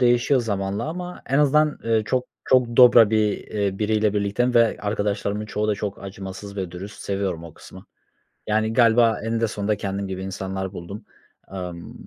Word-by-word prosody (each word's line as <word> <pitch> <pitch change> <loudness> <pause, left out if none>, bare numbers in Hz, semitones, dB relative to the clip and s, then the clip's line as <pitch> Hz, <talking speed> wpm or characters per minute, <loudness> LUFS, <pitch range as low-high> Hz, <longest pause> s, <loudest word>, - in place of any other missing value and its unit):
değişiyor 120 +2 +3
zamanla 100 -3 -2
ama 180 +2 -6
en 135 - +1
azından, 150 +1 +3
eee, 115 -1 +2
çok 130 -1 0 0.2
çok 125 -2 +2
dobra 120 -3 +8
bir 110 -2 +2
eee, 100 -2 -2
biriyle 105 -1 +1
birlikteyim 105 +5 0
ve 115 -2 +4
arkadaşlarımın 105 0 -2
çoğu 105 0 -2
da 105 - +2
çok 100 -1 -5
acımasız 100 +1 -8
ve 95 -3 -3
dürüst. 95 +3 -9
Seviyorum 95 -4 -3
o 85 - -11
kısmı. - - -13 0.6
Yani, 110 +1 +1
galiba 115 -2 +4
eninde 115 0 0
sonunda 105 0 -2
kendim 100 0 -3
gibi 95 0 -5
insanlar 95 0 -4
buldum. 95 +4 -8 0.5
Imm, 90 -3 -7
105 Hz, 165 wpm, -23 LUFS, 95-115 Hz, 0.6 s, dobra